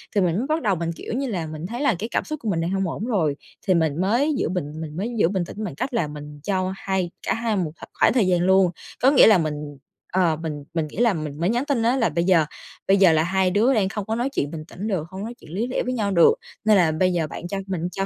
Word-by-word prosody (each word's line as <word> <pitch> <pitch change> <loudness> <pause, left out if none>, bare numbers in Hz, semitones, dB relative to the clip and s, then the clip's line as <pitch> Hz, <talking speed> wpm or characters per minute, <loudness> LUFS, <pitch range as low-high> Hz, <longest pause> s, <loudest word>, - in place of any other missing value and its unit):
thì 200 - +4
mình 180 0 +1
mới 245 - -1
bắt 310 +2 0
đầu 200 -4 +1
mình, 170 0 -2
kiểu - - -6
như 270 +3 -1
là, 180 -9 -3
mình 155 +1 -6
thấy 240 +5 -5
là 285 - +3
cái 225 - -4
cảm - - 0
xúc 305 -1 -5
của 215 - -1
mình 165 -3 0
đang 170 - -1
hông 195 -1 0
ổn 205 +6 -4
rồi, 170 - +1 0.3
thì 185 - +5
mình 160 -1 +1
mới 240 +11 +2
giữ - - 0
bình 155 -3 -4
mình 155 -1 -6
mới 205 +6 -2
giữ 165 - +5
bình 190 -3 -1
tĩnh 210 +5 -7
bằng 180 -10 -5
cách 255 - -3
là 175 -10 +1
mình 150 0 -9
cho 190 -1 -1
hai 190 -3 -2 0.2
cả - - +3
hai 225 0 -1
một 170 -5 -1
kh - - -17 0.2
khoảng - - +5
thời 235 -7 +3
gian 180 -1 +2
luôn. 190 0 +4 0.3
Có 265 +2 +6
nghĩa 280 - +7
là 215 -4 +7
mình 150 -2 -3 0.4
ờ, 175 -3 +3
mình 150 -3 -5
mình 160 -2 -1
nghĩ 150 - -13
là 235 -1 +3
mình 155 -3 -5
mới 175 +4 +1
nhắn 240 +4 0
tin 275 -6 0
á 240 +3 +2
là 230 -4 +2
bây 170 - 0
giờ 175 -4 +4 0.4
bây 195 - +5
giờ 190 -4 +6
là 160 0 +3
hai 185 +1 +1
đứa 225 +8 +3
đang 200 -4 +2
không 205 -1 -4
có 220 - -2
nói 245 +4 -1
chuyện 145 - -2
bình 160 -2 -6
tĩnh 195 +5 -6
được, 180 -7 -2
không 190 +2 -7
nói 230 - -5
chuyện - - -14
lý 215 +8 -1
lẽ 255 - -1
với 255 0 -2
nhau 205 -4 -1
được 170 - +6 0.3
nên 215 -1 +6
là 170 -4 +4
bây 185 +4 +1
giờ 165 -3 0
bạn 170 - -7
cho 195 - -3
mình 175 -2 -2
cho 195 +1 -2
190 Hz, 300 wpm, -23 LUFS, 165-220 Hz, 0.4 s, nghĩa